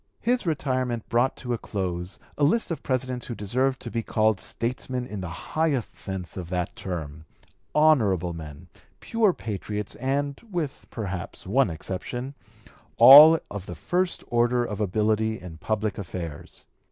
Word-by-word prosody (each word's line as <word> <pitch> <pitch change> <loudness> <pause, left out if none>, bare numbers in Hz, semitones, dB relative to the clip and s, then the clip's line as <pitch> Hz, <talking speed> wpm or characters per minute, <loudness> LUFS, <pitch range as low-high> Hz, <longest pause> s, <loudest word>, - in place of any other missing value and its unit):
His 245 -4 0
retirement 130 -6 -1
brought 120 +3 +2
to 125 -1 -3
a 115 - -2
close 90 -3 -4 0.2
a 150 - -1
list 180 +8 +2
of 165 - -3
Presidents 130 -2 -2
who 120 - -4
deserved 130 +6 0
to 120 - -6
be 115 - -1
called 110 -2 +1
statesmen 125 +1 -3
in 105 -5 -6
the 90 - -5 0.2
highest 155 -7 0
sense 95 -3 -5
of 90 -2 -6
that 90 -1 -2
term, 80 -4 -6 0.5
honorable 110 - +3
men, 75 -3 -9 0.3
pure 225 -3 +2
patriots, 105 - -5
and, 140 +2 -1
with 170 -8 -4
perhaps 95 -6 -5
one 120 +4 +2
exception, 120 - -5 0.6
all 145 +7 +11
of 105 -2 -6
the 90 - -6
first 180 - -1
order 120 +1 +2
of 105 -2 -4
ability 110 +2 +1
in 85 -3 -10
public 110 +1 -2
affairs. 85 -5 -7
115 Hz, 150 wpm, -26 LUFS, 95-135 Hz, 0.6 s, all